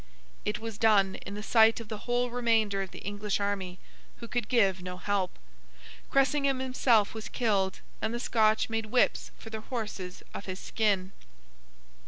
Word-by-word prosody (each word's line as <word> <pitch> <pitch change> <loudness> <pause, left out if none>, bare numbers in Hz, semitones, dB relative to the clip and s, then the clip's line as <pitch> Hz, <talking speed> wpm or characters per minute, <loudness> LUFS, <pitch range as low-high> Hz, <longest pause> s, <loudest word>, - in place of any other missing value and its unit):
It 210 - 0
was 225 -2 -6
done, 200 -4 +4
in 200 - -5
the 210 - -6
sight 225 0 +5
of 230 - -8
the 215 +1 -7
whole 245 0 +1
remainder 225 -5 +2
of 190 - -4
the - - -11
English 205 0 -2
army, 195 -3 -2 0.4
who 235 - -8
could 240 -2 -2
give 195 -7 +3
no 180 0 -6
help. 195 -1 -1 0.7
Cressingham 275 0 +3
himself 255 -5 +2
was 220 -1 -6
killed, 200 -6 0 0.2
and - - 0
the 240 - -3
Scotch 220 -2 +3
made 225 -1 -2
whips 245 +3 +2
for 225 - -11
their 220 0 -5
horses 210 -7 -5
of - - -6
his 185 0 -5
skin. 200 -4 0
215 Hz, 170 wpm, -29 LUFS, 200-235 Hz, 0.7 s, sight